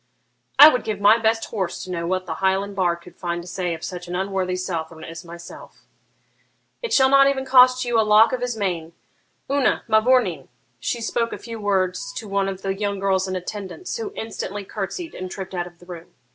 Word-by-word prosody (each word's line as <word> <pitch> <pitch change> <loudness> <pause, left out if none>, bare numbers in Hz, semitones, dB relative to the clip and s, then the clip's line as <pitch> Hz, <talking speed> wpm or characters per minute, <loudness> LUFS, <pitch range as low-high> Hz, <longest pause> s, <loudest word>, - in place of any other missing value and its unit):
'I 300 - +12
would 250 -5 -1
give 215 -2 -3
my 210 +3 +6
best 225 0 +1
horse 190 -6 -3
to 185 - -7
know 170 -1 -3
what 185 +1 -1
the 165 - -3
Highland 195 +1 +1
bard 175 -2 0
could 175 0 -15
find 175 -1 -3
to - - -13
say 180 -1 -2
of 160 - -12
such 180 -1 -7
an 175 - -4
unworthy 190 -1 -1
Southron 165 -3 -4
as 165 +1 -8
myself.' 170 0 -12 1.0
'It 475 - -4
shall 265 -1 +5
not 275 0 +6
even 270 -1 0
cost 255 -1 +6
you 240 -2 +2
a - - +6
lock 215 +2 +5
of 255 - -2
his 245 -2 -2
mane. 170 -5 -2 0.6
Una, 280 -2 +2
mavourneen! 220 - +2 0.3
(She 235 - -2
spoke 230 +1 -1
a - - -5
few 230 -1 -8
words 200 - 0
to 220 - -6
one 195 -1 0
of 195 0 -7
the 195 0 0
young 200 0 -2
girls 190 -1 +1
in 185 - -3
attendance, 200 - -5
who 445 -3 -5
instantly 205 -2 -5
curtsied 220 - -5
and 185 0 -6
tripped 190 0 -7
out 175 -1 -2
of 175 -1 -16
the 175 - -17
room.) 175 -2 -10
195 Hz, 215 wpm, -22 LUFS, 180-230 Hz, 1.0 s, I